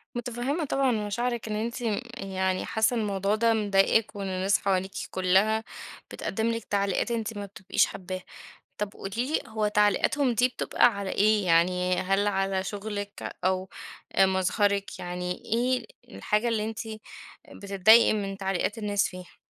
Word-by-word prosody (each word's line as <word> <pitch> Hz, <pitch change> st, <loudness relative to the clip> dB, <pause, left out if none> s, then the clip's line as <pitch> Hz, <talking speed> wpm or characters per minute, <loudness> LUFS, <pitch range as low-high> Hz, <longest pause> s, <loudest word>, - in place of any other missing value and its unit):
متفهِّمة 245 Hz, +6 st, -2 dB
طبعًا 270 Hz, -1 st, +1 dB
مشاعرِك 230 Hz, +2 st, -2 dB
إن 210 Hz, -, -2 dB
أنتِ 235 Hz, +3 st, -3 dB, 0.4 s
يعني 190 Hz, -2 st, -1 dB
حاسّة 220 Hz, +2 st, +1 dB
الموضوع 200 Hz, -2 st, 0 dB
ده 230 Hz, +1 st, +3 dB
مضايقِك، 205 Hz, +1 st, +2 dB
وإن 200 Hz, -1 st, -4 dB
الناس 190 Hz, +2 st, +1 dB
حواليكِ 190 Hz, -1 st, 0 dB, 0.2 s
كلَّها 190 Hz, +4 st, +2 dB, 0.5 s
بتقدّم 220 Hz, +3 st, -2 dB
لِك 230 Hz, 0 st, -3 dB
تعليقات 200 Hz, +3 st, 0 dB
أنتِ 225 Hz, -2 st, -2 dB
ما 205 Hz, -, -4 dB
بتبقيش 190 Hz, -1 st, 0 dB
حابّاها. 185 Hz, -1 st, -6 dB, 0.6 s
طب 205 Hz, -1 st, -3 dB
قولي 195 Hz, -, -7 dB, 0.2 s
لي -, -, +2 dB
هو 220 Hz, -1 st, -1 dB
تعليقاتهم 210 Hz, +6 st, +2 dB
دي 250 Hz, +3 st, +3 dB
بتبقى 250 Hz, -, +2 dB
على 195 Hz, -1 st, -3 dB
إيه 210 Hz, 0 st, +3 dB
يعني، 180 Hz, +2 st, +3 dB
هل 195 Hz, +2 st, +1 dB
على 195 Hz, -1 st, 0 dB
شغلِك 205 Hz, 0 st, -5 dB
أو 185 Hz, 0 st, 0 dB, 0.4 s
آآ، 195 Hz, -, +5 dB
مظهرِك، 200 Hz, +2 st, 0 dB
يعني 180 Hz, 0 st, -4 dB
إيه 250 Hz, +3 st, 0 dB, 0.3 s
الحاجة 210 Hz, +3 st, 0 dB
اللي 220 Hz, -2 st, 0 dB
أنتِ 225 Hz, -, -7 dB, 0.7 s
بتتضايقي 200 Hz, +4 st, +5 dB
من 195 Hz, -2 st, -3 dB
تعليقات 195 Hz, +3 st, -1 dB
الناس 205 Hz, -2 st, +1 dB
فيها؟ 180 Hz, -1 st, -12 dB
205 Hz, 145 wpm, -27 LUFS, 190-220 Hz, 0.7 s, آآ